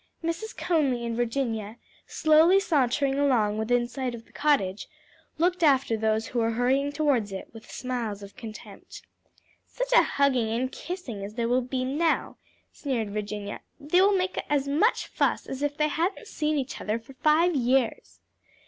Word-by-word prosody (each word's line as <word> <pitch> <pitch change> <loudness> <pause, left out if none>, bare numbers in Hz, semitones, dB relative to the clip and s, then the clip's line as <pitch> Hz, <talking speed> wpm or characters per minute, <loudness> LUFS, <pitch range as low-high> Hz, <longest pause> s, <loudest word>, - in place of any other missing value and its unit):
Mrs. 335 +7 -4
Conly 280 -9 +1
and 230 -1 -2
Virginia, 230 -3 -2 0.3
slowly 320 +5 +5
sauntering 275 -5 +1
along 220 -7 +2
within 240 +2 +1
sight 250 -1 -4
of 230 -1 -12
the - - -24
cottage, 265 -10 0 0.5
looked 350 +2 +1
after 270 -7 +3
those 220 0 0
who 245 - -1
were 225 0 +2
hurrying 265 +4 +1
towards 285 -8 +1
it, 190 - -7
with 225 0 -13
smiles 235 -6 -4
of 200 - -11
contempt. 220 -3 -10 0.6
"Such - - -4
a - - +8
hugging 260 -5 +1
and 245 +4 -1
kissing 290 - -6
as 205 +2 -7
there 235 -1 -1
will 250 +2 +2
be 255 +1 -3
now!" 310 +5 0 0.3
sneered 235 -8 -3
Virginia; 205 -1 -5 0.2
"they 310 +6 +3
will 395 0 +4
make 370 0 -1
as 280 -2 +1
much 320 - +2
fuss - - 0
as 270 - -6
if 290 0 -1
they 300 - +2
hadn't 340 +6 -2
seen 305 0 -1
each 270 -1 -4
other 215 +2 -1
for 230 +4 -13
five 310 +5 +3
years." 250 -2 0
260 Hz, 165 wpm, -26 LUFS, 225-305 Hz, 0.6 s, a